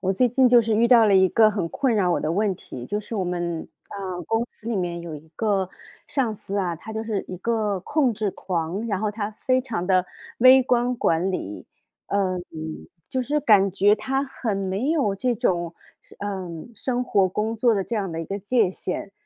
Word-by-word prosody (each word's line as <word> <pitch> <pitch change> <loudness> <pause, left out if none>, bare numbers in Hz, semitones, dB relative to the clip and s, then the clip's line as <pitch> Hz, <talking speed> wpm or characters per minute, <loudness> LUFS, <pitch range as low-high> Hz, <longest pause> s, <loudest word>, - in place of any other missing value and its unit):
我 190 0 +1
最 250 +6 +3
近 255 +2 +4
就 240 -1 +7
是 225 -1 0
遇 230 +2 +4
到 235 -3 +7
了 200 - +4
一 190 0 +6
个 215 +3 +5
很 195 -5 -2
困 250 +5 0
扰 185 -4 +2
我 - - 0
的 155 - -1
问 205 +1 +1
题。 125 -7 -9
就 205 - -2
是 220 +2 -7
我 190 - 0
们， 175 -2 -3 0.2
啊， 190 -3 -5
公 225 +1 +1
司 220 - -16
里 230 - 0
面 175 -2 -2
有 170 -2 -7
一 150 +2 -11
个 200 -4 0 0.4
上 245 -6 -1
司 200 -1 -6
啊， 180 -4 0
他 220 +7 -9
就 220 0 -3
是 215 -3 -2
一 185 - -5
个 210 -1 -1
控 275 - +1
制 210 -1 -2
狂， 180 +4 -3
然 200 -4 -1
后 215 -1 0
他 210 0 -4
非 255 +4 0
常 220 -8 -4
的 185 -1 +3 0.3
微 255 +2 +8
观 245 0 +1
管 170 -2 +1
理。 105 - -5 0.4
嗯， 185 -3 0 0.7
就 260 - -1
是 295 +4 0
感 205 -7 +5
觉 200 +2 +4
他 265 +6 -1
很 230 -6 -3
没 195 +8 -1
有 275 -12 +1
这 245 +4 0
种， 175 -7 0 0.5
嗯， 190 -2 -5
生 250 +1 -2
活 195 -5 +3
工 215 +4 -2
作 230 +1 +3
的 195 -2 -1
这 235 - -4
样 200 -4 -1
的 165 0 -4
一 - - -4
个 195 +5 -4
界 205 0 +2
限。 185 +1 -5
205 Hz, 230 characters per minute, -24 LUFS, 185-235 Hz, 0.7 s, 微